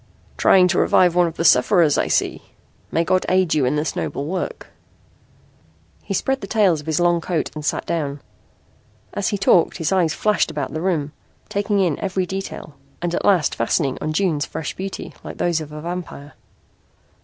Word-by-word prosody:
"Trying 185 -1 +5
to 175 - +1
revive 180 -2 +4
one 175 0 +3
of 165 - -6
the 165 - -2
sufferers, 155 +3 +5
I - - +1
see. - - 0 0.5
May 165 - +1
God 185 +2 +1
aid 185 -2 +2
you 150 -4 +2
in 125 - +1
this 150 +1 -2
noble 140 - -3
work." 180 +4 -4 1.3
He 195 - -4
spread 270 +7 -1
the 195 - -6
tails 195 -8 +2
of 150 - -16
his 160 0 0
long 175 -1 +2
coat 165 -2 -2
and 155 - -7
sat - - -1
down. 145 -4 -2 0.9
As 205 - -1
he 205 - 0
talked 185 -3 +3
his 165 -1 -1
eyes 180 -5 +2
flashed 210 -4 +1
about 145 -4 -4
the 155 - -3
room, 160 -5 -1 0.4
taking 205 +1 0
in 175 -6 +1
every 190 -1 -1
detail 190 -4 -6 0.3
and 175 0 -2
at - - -1
last 180 -7 +3
fastening 135 +4 0
on 155 - -2
June's 155 -3 0
fresh 160 0 -5
beauty 195 +1 -6
like - - -8
those 170 -2 0
of 150 -1 -8
a 150 0 -7
vampire. 170 -4 -6
170 Hz, 190 wpm, -21 LUFS, 155-190 Hz, 1.3 s, Trying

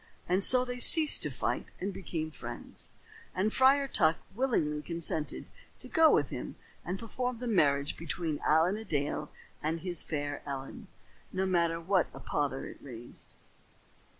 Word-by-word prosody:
And 185 +2 +2
so 255 +3 +6
they 245 0 -5
ceased 310 +4 +8
to - - 0
fight - - -2
and 195 +2 -3
became 160 -4 -5
friends; 120 -5 -6 0.5
and 205 +4 0
Friar 275 +2 +4
Tuck 165 -10 +3 0.2
willingly 180 - 0
consented 160 -1 -1 0.3
to - - -9
go 320 -1 +5
with - - +1
him - - -6 0.3
and 180 +2 -4
perform 245 +3 -4
the 245 - -6
marriage 145 -10 +1
between 165 -2 -4
Allen 165 +6 +3
a 220 - -6
Dale 150 -4 -2 0.3
and 160 +2 -2
his 175 -2 -1
fair 145 -2 -4
Ellen, 140 - -7 0.4
no 190 0 -1
matter 170 -3 +1
what 180 +1 +1
a - - -8
pother 140 -2 -2
it - - -10
raised. 120 -3 -7
170 Hz, 155 wpm, -30 LUFS, 150-220 Hz, 0.5 s, ceased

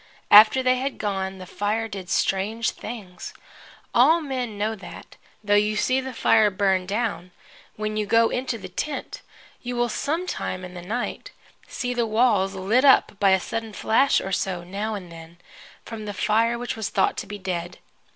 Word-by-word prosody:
After 215 +5 +8
they 255 0 +3
had 270 +2 -3
gone, 195 -2 -3
the 185 - -9
fire 210 +4 -2
did 195 -4 -8
strange 215 +4 0
things. 205 -6 -9 0.6
All 280 +8 +5
men 255 -8 -4
know 215 +2 -1
that, 205 - -11 0.3
though 205 0 +1
you 210 +1 +3
see 255 +5 +1
the 265 0 -6
fire 220 -3 +3
burned 190 -2 0
down, 205 -3 -2 0.5
when 215 0 -3
you 210 -1 -1
go 230 +2 +4
into 250 -2 -2
the 190 -3 -8
tent 275 +11 -5 0.4
you 245 0 -5
will 240 0 +1
some 320 +10 -2
time 185 - -4
in 180 - -10
the 180 - -8
night 220 +8 -4 0.4
see 245 0 -3
the 240 -2 0
walls 215 -4 +2
lit 205 +7 +1
up 265 -7 +4
by 200 - +4
a 190 0 +4
sudden 225 +2 -5
flash 265 +7 +2
or 195 - -5
so, 180 -2 -2
now 205 +5 -4
and 180 -4 -8
then, 165 0 -12 0.5
from 220 -2 -7
the 205 -1 -5
fire 225 +4 +1
which 245 0 -4
was 220 -2 -3
thought - - +1
to - - -5
be 205 - -6
dead. 180 -3 -4
215 Hz, 185 wpm, -24 LUFS, 190-240 Hz, 0.6 s, After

